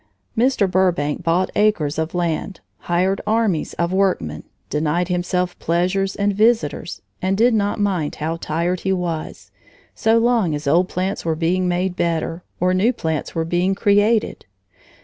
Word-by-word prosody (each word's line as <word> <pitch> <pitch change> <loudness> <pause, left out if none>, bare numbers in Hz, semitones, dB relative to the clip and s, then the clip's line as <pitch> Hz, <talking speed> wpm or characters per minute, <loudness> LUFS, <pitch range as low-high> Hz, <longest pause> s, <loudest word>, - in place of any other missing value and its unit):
Mr. 245 -2 +2
Burbank 180 -6 +1
bought 175 +2 +1
acres 165 -8 +1
of 160 +2 -3
land, 175 +2 -2 0.3
hired 185 +3 +1
armies 215 -7 +1
of 170 +1 -1
workmen, 190 - 0 0.2
denied 160 +4 0
himself 180 0 -1
pleasures 185 +3 0
and 200 0 +1
visitors, 215 -6 +1 0.2
and 190 +1 0
did 235 +2 +4
not 205 -1 0
mind 185 -7 0
how 160 +2 -2
tired 170 +3 -1
he 190 - -1
was, 175 -4 -4 0.4
so 225 +1 +2
long 230 -8 +2
as 145 - -6
old 170 +6 +3
plants 190 +3 -2
were 165 -1 0
being 180 +3 0
made 180 +1 -1
better, 165 0 -1 0.2
or 180 +1 +2
new 195 +6 +3
plants 160 - -3
were 165 0 0
being 175 +3 +1
created. 205 +3 +2
180 Hz, 150 wpm, -20 LUFS, 165-200 Hz, 0.4 s, did